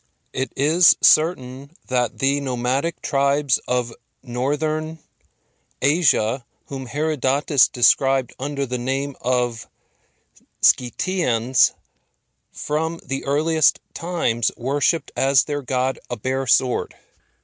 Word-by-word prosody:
It 130 -2 -3
is 165 +5 +5
certain 140 -3 +2
that 125 -2 -1
the 140 +1 +1
nomadic 130 +4 -2
tribes 140 -1 +1
of 125 -2 -1 0.3
Northern 150 +5 -2 0.8
Asia, 135 -5 +2 0.2
whom 135 -2 -7
Herodotus 145 0 +1
described 135 +1 +2
under 140 +1 -3
the 125 -1 -4
name 135 +2 -3
of 125 -2 -1 0.9
Scythians, 125 -3 +2 0.8
from 160 +2 -3
the 135 0 -4
earliest 155 +2 +2
times 165 -10 -1
worshipped 145 +6 -1
as 135 -1 +3
their 145 -1 -4
god 130 0 -2
a 120 - -4
bare 130 +4 -3
sword. 125 +1 +1
135 Hz, 100 wpm, -21 LUFS, 125-150 Hz, 0.9 s, is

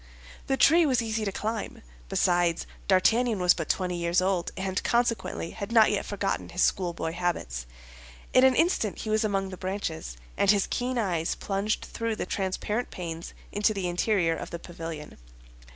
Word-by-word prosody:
The 270 - +1
tree 335 +5 +6
was 255 -6 +2
easy 220 -1 -2
to 200 - -1
climb. 220 +2 -4 0.3
Besides, 175 - +2 0.2
D'Artagnan 220 +5 +3
was 180 -1 +5
but 165 -3 -5
twenty 180 -2 0
years 170 +1 +2
old, 185 -2 0
and 190 0 -2
consequently 235 -7 0
had 205 0 -6
not 225 -2 +6
yet 205 - -1
forgotten 200 -1 -2
his 180 - 0
schoolboy 170 -3 0
habits. 65 - -2 0.7
In 255 - +6
an 260 -1 +6
instant 325 - +1
he 215 - -4
was 215 0 +2
among 195 -2 0
the 185 - -8
branches, 175 - -4 0.2
and 200 - +2
his 200 -1 +5
keen 250 +1 -2
eyes 175 -7 0
plunged 200 +2 -2
through 230 -1 -3
the - - -3
transparent 200 +5 -2
panes 170 -2 -6 0.2
into 210 +1 +1
the 190 -2 -1
interior 175 -1 +1
of - - -6
the 170 - -5
pavilion. 165 - -8
195 Hz, 170 wpm, -27 LUFS, 175-220 Hz, 0.7 s, tree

